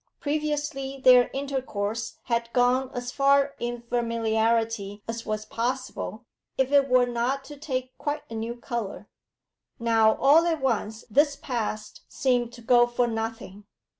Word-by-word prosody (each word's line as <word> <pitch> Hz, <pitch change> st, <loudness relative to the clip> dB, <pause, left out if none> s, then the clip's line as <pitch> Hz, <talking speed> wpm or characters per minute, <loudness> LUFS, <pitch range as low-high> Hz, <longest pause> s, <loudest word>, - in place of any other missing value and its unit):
Previously 290 Hz, -2 st, -2 dB
their 250 Hz, -1 st, +7 dB
intercourse 235 Hz, -6 st, -3 dB
had 235 Hz, -1 st, -1 dB
gone 250 Hz, +1 st, +2 dB
as 245 Hz, -1 st, -5 dB
far 280 Hz, +1 st, +3 dB
in 240 Hz, 0 st, -4 dB
familiarity 225 Hz, -3 st, 0 dB
as 230 Hz, 0 st, -5 dB
was 215 Hz, 0 st, -2 dB
possible 250 Hz, -1 st, -4 dB, 0.3 s
if 265 Hz, 0 st, +1 dB
it 280 Hz, -1 st, +4 dB
were 250 Hz, 0 st, +5 dB
not 245 Hz, +3 st, -1 dB
to 290 Hz, +2 st, -10 dB
take 260 Hz, -3 st, -4 dB
quite 295 Hz, 0 st, -3 dB
a -, -, -10 dB
new 225 Hz, +1 st, -4 dB
colour; 235 Hz, -4 st, -5 dB, 0.7 s
now 225 Hz, -2 st, +3 dB
all 310 Hz, +5 st, +5 dB
at 325 Hz, -2 st, 0 dB
once 225 Hz, -4 st, -1 dB
this 285 Hz, +5 st, +3 dB
past 225 Hz, -6 st, -4 dB
seemed 245 Hz, -3 st, 0 dB
to 240 Hz, -, -12 dB
go 240 Hz, 0 st, +5 dB
for 240 Hz, 0 st, +1 dB
nothing. 225 Hz, -3 st, -5 dB
245 Hz, 140 wpm, -26 LUFS, 225-270 Hz, 0.7 s, their